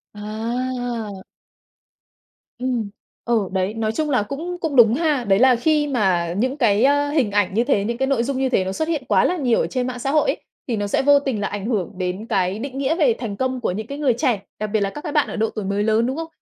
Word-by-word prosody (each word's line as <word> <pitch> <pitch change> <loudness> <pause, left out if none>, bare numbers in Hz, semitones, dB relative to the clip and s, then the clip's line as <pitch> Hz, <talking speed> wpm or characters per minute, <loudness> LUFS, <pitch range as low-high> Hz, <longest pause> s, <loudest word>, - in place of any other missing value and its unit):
À! 225 -1 -4 1.4
Ừm, 245 -5 -1 0.4
ừ, 225 -5 +1
đấy, 190 +2 -1
nói 225 -1 -1
chung 300 +6 -2
là 250 -7 +2
cũng 330 +10 -5
cũng 315 -4 -2
đúng 230 -3 +7
ha. 295 -4 +1
Đấy 195 0 +3
là 255 0 +6
khi 295 +4 +1
mà 185 -10 +1
những 260 +6 0
cái, 220 -4 +3
ơ, 285 +1 +3
hình 270 -9 +1
ảnh 200 -2 +1
như 230 - +2
thế, 240 -6 +1
những 235 +3 -2
cái 265 +1 0
nội 255 -4 +1
dung 270 +1 -2
như 265 0 +1
thế 190 -7 +1
nó 190 - -2
xuất 315 +10 -2
hiện 310 -5 -1
quá - - +3
là 360 - +1
nhiều 250 -6 +2
ở - - -1
trên 255 -1 -2
mạng 250 -1 -5
xã 270 +3 -1
hội 300 0 +3
ấy, - - 0 0.3
thì 235 - 0
nó 205 0 -1
sẽ - - +1
vô 285 +1 +5
tình 265 -7 -2
là 205 - 0
ảnh 205 0 -5
hưởng 210 -8 -1
đến 185 +4 -3
cái 195 -2 0
định 270 +1 -6
nghĩa 275 +4 +1
về 290 -9 +3
thành 210 -5 -4
công 260 -1 -1
của 185 - 0
những 215 +4 -5
cái 280 - -6
người 285 -4 +2
trẻ, 240 -5 0 0.2
đặc 215 - -2
biệt 215 - +3
là 200 - 0
các 295 +9 -8
cái 305 - -5
bạn 295 -1 +2
ở - - -6
độ 220 0 0
tuổi 215 -3 -5
mới 200 +1 0
lớn, 220 +2 +2
đúng 260 +4 -2
không? 325 0 -4
240 Hz, 265 wpm, -21 LUFS, 210-275 Hz, 1.4 s, đúng